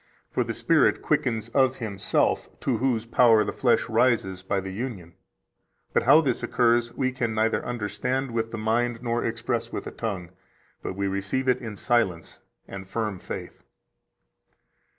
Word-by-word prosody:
For -, -, +1 dB
the -, -, -4 dB
Spirit -, -, +3 dB
quickens 115 Hz, -2 st, 0 dB
of 130 Hz, +1 st, +3 dB
Himself, 105 Hz, -4 st, 0 dB
to 125 Hz, -4 st, 0 dB
Whose 120 Hz, -2 st, 0 dB
power 115 Hz, -2 st, +5 dB
the -, -, -3 dB
flesh -, -, +2 dB
rises 100 Hz, -7 st, +1 dB
by 95 Hz, +1 st, -1 dB
the 95 Hz, 0 st, -6 dB
union. 95 Hz, -6 st, -6 dB, 0.8 s
But -, -, +3 dB
how 145 Hz, +6 st, +6 dB
this 130 Hz, -6 st, -1 dB
occurs 120 Hz, 0 st, +2 dB
we 130 Hz, -1 st, 0 dB
can 120 Hz, -3 st, -2 dB
neither 110 Hz, +1 st, +1 dB
understand 120 Hz, +3 st, -2 dB
with 115 Hz, -1 st, -1 dB
the 115 Hz, -, -6 dB
mind 115 Hz, +2 st, 0 dB
nor 120 Hz, -1 st, 0 dB
express 115 Hz, 0 st, -2 dB
with -, -, -4 dB
the -, -, -7 dB
tongue, 95 Hz, -6 st, -4 dB, 0.5 s
but -, -, -5 dB
we 100 Hz, 0 st, -2 dB
receive 100 Hz, +7 st, -2 dB
it 125 Hz, -, +2 dB
in 110 Hz, -4 st, -6 dB
silence 100 Hz, -7 st, 0 dB, 0.3 s
and 95 Hz, -1 st, -8 dB
firm 105 Hz, -4 st, -2 dB
faith." -, -, -7 dB
115 Hz, 160 wpm, -26 LUFS, 100-120 Hz, 0.8 s, how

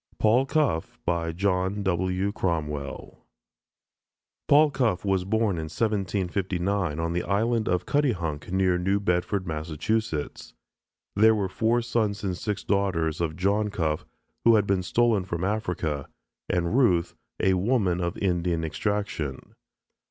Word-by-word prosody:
PAUL 120 Hz, +5 st, +3 dB
CUFFE 135 Hz, -, 0 dB, 0.4 s
JOHN 95 Hz, +1 st, 0 dB
W. 95 Hz, +1 st, 0 dB
CROMWELL 75 Hz, -8 st, -3 dB, 1.2 s
Paul 150 Hz, +1 st, +6 dB
Cuffe 110 Hz, -9 st, 0 dB
was 95 Hz, -2 st, +1 dB
born 110 Hz, -2 st, +1 dB
in 80 Hz, -, -3 dB
1759 95 Hz, -4 st, -1 dB
on 85 Hz, +1 st, -1 dB
the 90 Hz, -, 0 dB
island 110 Hz, +4 st, 0 dB
of 90 Hz, 0 st, 0 dB
Cuttyhunk, 90 Hz, -, -1 dB
near 95 Hz, -1 st, +2 dB
New 95 Hz, +3 st, +1 dB
Bedford, 90 Hz, 0 st, 0 dB
Massachusetts. 80 Hz, -, -3 dB, 0.6 s
There 110 Hz, +2 st, +6 dB
were 100 Hz, -3 st, 0 dB
four 115 Hz, +5 st, +1 dB
sons 110 Hz, -3 st, -1 dB
and 95 Hz, -2 st, -1 dB
six 105 Hz, +2 st, -3 dB
daughters 85 Hz, -6 st, 0 dB
of 80 Hz, -2 st, -1 dB
John 100 Hz, +4 st, +1 dB
Cuffe 80 Hz, -6 st, -2 dB, 0.4 s
who 115 Hz, -1 st, +6 dB
had 105 Hz, -2 st, +3 dB
been 100 Hz, -2 st, +1 dB
stolen 115 Hz, +1 st, +2 dB
from 85 Hz, -1 st, -4 dB
Africa, 90 Hz, -8 st, -2 dB, 0.4 s
and 90 Hz, +3 st, 0 dB
Ruth, 95 Hz, -11 st, +3 dB, 0.3 s
a 95 Hz, -, +3 dB
woman 95 Hz, -2 st, +1 dB
of 85 Hz, 0 st, -2 dB
Indian 85 Hz, -3 st, 0 dB
extraction. 85 Hz, -6 st, -3 dB
95 Hz, 130 wpm, -26 LUFS, 85-105 Hz, 1.2 s, Paul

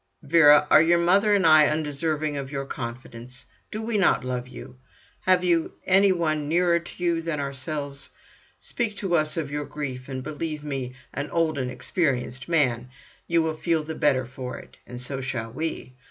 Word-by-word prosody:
"Vera, 150 Hz, -1 st, +6 dB
are -, -, +8 dB
your 170 Hz, +2 st, +4 dB
mother 195 Hz, +5 st, +4 dB
and 195 Hz, -3 st, +2 dB
I 155 Hz, -2 st, +7 dB
undeserving 150 Hz, 0 st, -1 dB
of 140 Hz, -1 st, -5 dB
your 140 Hz, -1 st, -3 dB
confidence? 125 Hz, 0 st, -8 dB, 0.2 s
Do 215 Hz, +1 st, -5 dB
we 220 Hz, -2 st, 0 dB
not 185 Hz, -, +3 dB
love 125 Hz, -1 st, -3 dB
you? 125 Hz, 0 st, -11 dB, 0.5 s
Have 185 Hz, -1 st, +4 dB
you 170 Hz, -2 st, +1 dB
any 195 Hz, +1 st, +5 dB
one 155 Hz, -4 st, 0 dB
nearer 170 Hz, +1 st, +3 dB
to 170 Hz, +1 st, -10 dB
you 170 Hz, -1 st, +1 dB
than 165 Hz, -2 st, -3 dB
ourselves? 140 Hz, 0 st, -5 dB, 0.5 s
Speak 230 Hz, -4 st, -3 dB
to 190 Hz, -4 st, 0 dB
us 155 Hz, 0 st, 0 dB
of 150 Hz, -4 st, -3 dB
your 145 Hz, 0 st, -3 dB
grief, 135 Hz, -3 st, -6 dB
and 130 Hz, -1 st, -5 dB
believe 155 Hz, +1 st, -5 dB
me, 135 Hz, -4 st, -4 dB, 0.2 s
an 140 Hz, +1 st, -4 dB
old 160 Hz, -3 st, 0 dB
and 125 Hz, -1 st, -2 dB
experienced 130 Hz, -1 st, -2 dB
man, 125 Hz, -7 st, +1 dB, 0.4 s
you 170 Hz, -1 st, +2 dB
will 160 Hz, -1 st, -2 dB
feel 160 Hz, -1 st, 0 dB
the 160 Hz, +1 st, -5 dB
better 135 Hz, -4 st, +1 dB
for 125 Hz, +1 st, -7 dB
it. -, -, -14 dB
And 125 Hz, -, -8 dB
so 135 Hz, +2 st, -5 dB
shall 120 Hz, -3 st, -4 dB
we. 155 Hz, -3 st, -4 dB
150 Hz, 185 wpm, -25 LUFS, 130-170 Hz, 0.5 s, are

